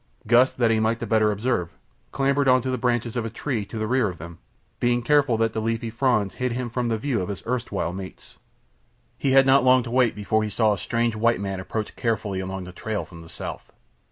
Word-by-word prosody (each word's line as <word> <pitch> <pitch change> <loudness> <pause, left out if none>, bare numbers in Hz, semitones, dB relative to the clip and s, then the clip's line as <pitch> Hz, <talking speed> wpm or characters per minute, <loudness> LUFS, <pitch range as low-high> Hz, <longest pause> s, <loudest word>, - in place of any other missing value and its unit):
Gust, 120 +3 +4
that 120 -2 +3
he 110 - +2
might 110 +1 +1
the 120 - -5
better 110 -1 +3
observe, 105 -5 -2 0.3
clambered 140 +1 +1
into 130 0 +3
the 130 - -1
branches 120 -1 0
of 120 - -1
a 115 - -3
tree 115 -2 -3
to 110 - -8
the 110 - -1
rear 120 -1 +1
of 90 - -8
them, 85 +1 -10 0.4
being 120 0 +1
careful 140 -3 +3
that 115 0 +1
the 110 - -2
leafy 115 0 -2
fronds 115 -5 +1
hid 125 -1 -2
him 120 -1 -4
from 120 0 -1
the 115 -1 0
view 120 -2 -1
of 90 - -4
his 100 - -6
erstwhile 115 -8 -2
mates. 95 0 -10 0.8
He 135 - +1
had 135 0 +7
not 135 0 +5
long 130 0 +5
to 115 - -7
wait 125 -2 +3
before 105 +1 0
he 110 - -2
saw 110 0 +2
a - - -3
strange 115 +3 0
white 115 +2 +2
man 95 -1 -3
approach 105 +3 -4
carefully 110 -4 -1
along 95 0 -4
the 90 - -9
trail 105 +3 -4
from 85 -2 -13
the 80 - -13
south. - - -7
115 Hz, 235 wpm, -24 LUFS, 105-125 Hz, 0.8 s, had